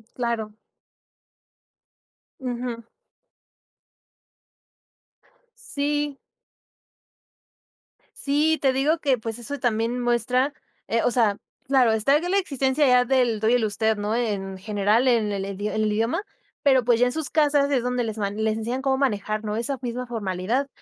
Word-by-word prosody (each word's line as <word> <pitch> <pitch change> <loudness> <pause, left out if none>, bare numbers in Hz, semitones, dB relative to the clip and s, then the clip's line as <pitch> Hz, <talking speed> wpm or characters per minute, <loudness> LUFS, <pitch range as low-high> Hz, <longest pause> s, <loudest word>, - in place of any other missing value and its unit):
Claro. 230 -3 -2 1.9
Ujú. 245 -2 -4 2.7
Sí. 295 -9 -2 2.0
Sí, 300 +3 +1
te 270 -2 +3
digo 295 +5 +1
que 275 -5 +2
pues, 225 0 -5
eso 275 +4 -5
también 235 0 0
muestra, 245 +3 +1 0.3
eh, 230 +1 +1
o - - +2
sea, 220 -4 +2 0.3
claro, 260 -4 +4
está 275 +7 +3
la 355 +4 0
existencia 275 -5 +1
ya 250 0 +5
del 245 -4 +2
tú 220 - +1
y 230 - +4
el 245 -3 +3
usted, 220 +1 0
¿no?, 210 +2 -1
en 200 -5 -2
general 210 +4 +1
en 225 -4 +2
el 195 -1 -2
en 195 0 -6
el 215 +1 0
idioma. 225 - 0 0.4
Pero 265 -4 +3
pues, 235 -1 +3
ya 245 - +4
en - - -1
sus 315 +2 -2
casas 290 -2 +3
es 260 -4 +1
donde 250 0 -1
les 220 -1 -4
ma 200 -2 -1
les 215 +1 -1
enseñan 240 +4 -3
cómo 270 -1 +1
manejar, 215 -5 -1
¿no?, 210 0 -3
esa 270 +4 -1
misma 250 0 -4
formalidad. 220 +3 -2
240 Hz, 145 wpm, -24 LUFS, 220-270 Hz, 2.7 s, ya